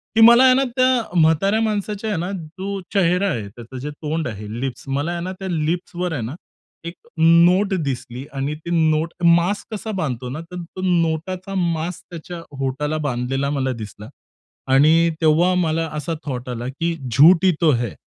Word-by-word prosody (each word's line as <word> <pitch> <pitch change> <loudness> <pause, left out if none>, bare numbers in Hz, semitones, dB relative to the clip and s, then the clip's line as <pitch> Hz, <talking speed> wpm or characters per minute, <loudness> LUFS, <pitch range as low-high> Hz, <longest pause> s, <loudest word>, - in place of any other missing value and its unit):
की 225 - +5
मला 235 +3 +8
आहे 260 -1 +7
ना 265 +1 +3
त्या 255 -8 +1
म्हाताऱ्या 165 +7 +3
माणसाच्या 210 0 -2
आहे 205 - -1
ना 175 +3 -3
जो 190 +3 -5
चेहरा 180 0 +2
आहे 110 - -3
त्याचं 120 +5 -11
जे 145 +4 -5
तोंड 155 +2 -3
आहे, 105 -2 -7
लिप्स. 130 -2 -4
मला 140 +5 -1
आहे 175 0 -3
ना 185 - -4
त्या 190 - -5
लिप्सवर 175 +2 -2
आहे 140 - -3
ना 115 +6 -5 0.5
एक 170 - -7 0.2
नोट 170 +5 +5
दिसली 130 -1 -5
आणि 140 +2 -2
ती 160 +2 -10 0.2
नोट 155 +2 0
मास्क 175 +6 +2
कसा 215 +1 -4
बांधतो 125 -5 -3
ना 140 +5 -5
तर 180 0 -5
तो 175 +2 -9
नोटाचा 180 +2 -1
मास्क 170 -1 -2
त्याच्या 170 0 -8 0.2
ओठाला 150 +4 -2
बांधलेला 135 +2 -1
मला 130 0 0
दिसला 105 +1 -10 0.6
आणि 160 +5 +5
तेव्हा 165 +3 +4
मला 165 0 0
असा 155 +2 -3
थॉट 125 -3 -5
आला 120 0 -4
की, 165 +6 -2 0.2
"झूठ 165 - +6
ही 185 - +6
तो 160 -2 +5
है." 120 -4 -1
165 Hz, 180 wpm, -21 LUFS, 135-185 Hz, 0.6 s, मला